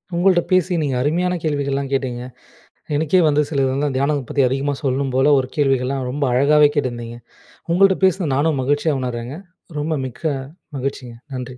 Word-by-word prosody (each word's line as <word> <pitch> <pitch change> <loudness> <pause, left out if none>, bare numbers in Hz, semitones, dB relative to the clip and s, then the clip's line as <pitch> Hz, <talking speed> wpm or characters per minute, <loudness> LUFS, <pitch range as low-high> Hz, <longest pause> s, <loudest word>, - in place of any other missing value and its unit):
உங்கள்ட்ட 175 0 +4
பேசி 185 -1 +2
நீங்க 140 -4 -1
அருமையான 175 +6 +1
கேள்விகள்லாம் 140 -3 -1
கேட்டீங்க. 125 -3 -2 0.7
எனக்கே 160 +5 +2
வந்து 150 0 +3
சில 140 -3 +1
இதெல்லாம் 135 +1 -1
தியானத்த 140 +1 +1
பத்தி 140 - +1
அதிகமா 135 +2 -1
சொல்லணும் 135 -1 -1
போல 135 +3 +4
ஒரு 130 -1 -2
கேள்விகள்லாம் 135 -2 +1
ரொம்ப 145 +2 -2
அழகாவே 145 +4 +5
கேட்ருந்திங்க. 120 -4 -3 0.6
உங்கள்ட்ட 190 +1 +4
பேசுன 185 -3 +1
நானும் 145 -1 +1
மகிழ்ச்சியா 145 +4 +1
உணருறேங்க. 125 +3 -4 0.4
ரொம்ப 155 +2 -1
மிக்க 125 +5 -13 0.5
மகிழ்ச்சிங்க. 130 -2 -4 0.2
நன்றி. 125 0 -6
140 Hz, 150 wpm, -20 LUFS, 130-150 Hz, 0.7 s, அழகாவே